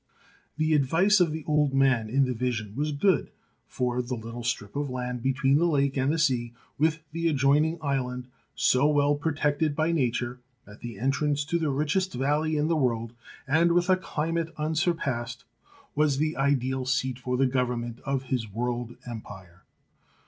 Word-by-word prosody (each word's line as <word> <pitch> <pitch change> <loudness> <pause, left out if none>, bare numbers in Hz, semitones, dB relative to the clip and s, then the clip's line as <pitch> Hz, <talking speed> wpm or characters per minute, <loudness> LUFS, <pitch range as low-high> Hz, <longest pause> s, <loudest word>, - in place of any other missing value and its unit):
The 155 0 +2
advice 165 +9 +4
of 175 -3 +3
the 160 0 -5
old 150 -3 +2
man 130 -5 +3
in 135 +4 +3
the 130 - -1
vision 115 -4 -2
was 150 +3 -1
good, 180 +7 +2 0.4
for 125 0 -1
the 125 +1 -4
little 115 +1 -7
strip 115 -3 -3
of 145 -1 -2
land 125 -1 -4
be 135 - +2
tween 135 +1 +2
the 175 - +3
lake 140 -4 +1
and 135 +1 +1
the 165 - 0
sea, 125 -7 +1 0.3
with 160 +1 +1
the 165 +1 -1
adjoining 150 +2 +3
island, 125 -3 -2 0.3
so 130 +3 +3
well 145 -1 +3
protected 145 0 0
by 160 +2 +1
nature, 125 -4 -1 0.3
at 105 0 -14
the 115 -3 -7
entrance 145 +4 0
to 170 +3 0
the 160 -2 0
richest 155 +7 0
valley 150 +4 +1
in 150 +1 +1
the 165 - +2
world, 115 -5 0 0.3
and 165 +4 +3
with 175 +2 +3
a - - +6
climate 165 -2 -2
unsurpassed, 150 -6 -1 0.5
was 150 -2 +2
the 155 +2 0
ideal 130 -2 0
seat 130 -1 0
for 125 0 -2
the 135 - +3
government 125 -2 -1
of 135 -1 -1
his 125 -5 -3
world 120 +2 -3
empire. 95 -7 -10
135 Hz, 175 wpm, -27 LUFS, 125-155 Hz, 0.5 s, a